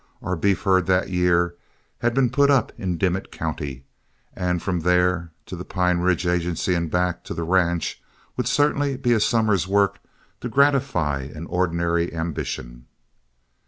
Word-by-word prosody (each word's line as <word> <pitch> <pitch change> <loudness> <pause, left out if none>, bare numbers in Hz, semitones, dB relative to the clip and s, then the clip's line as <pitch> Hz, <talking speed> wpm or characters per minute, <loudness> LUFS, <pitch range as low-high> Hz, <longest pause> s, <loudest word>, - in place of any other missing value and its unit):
Our 90 +1 -1
beef 100 +4 +1
herd 95 -3 +3
that 95 0 +1
year 90 -1 +2 0.5
had 120 0 0
been 130 -3 +3
put 140 +2 +3
up 135 -5 +3
in 90 -6 -3
Dimmit 95 +2 -1
County, 65 -2 -5 0.5
and 90 -1 -1
from 90 0 -2
there 90 0 +1
to 95 - -7
the 90 - -6
Pine 90 -2 0
Ridge 90 0 +1
Agency 90 +1 0
and 85 -2 -1
back 90 +1 0
to - - -5
the 85 - -3
ranch 85 -1 0 0.3
would 125 -2 -2
certainly 145 0 +1
be 125 -2 +2
a 115 - +3
summer's 105 -5 +2
work 100 0 +2 0.4
to 125 - -5
gratify 115 - +2
an 80 +2 -7
ordinary 85 -1 0
ambition. 65 -7 -5
90 Hz, 160 wpm, -23 LUFS, 85-100 Hz, 0.5 s, herd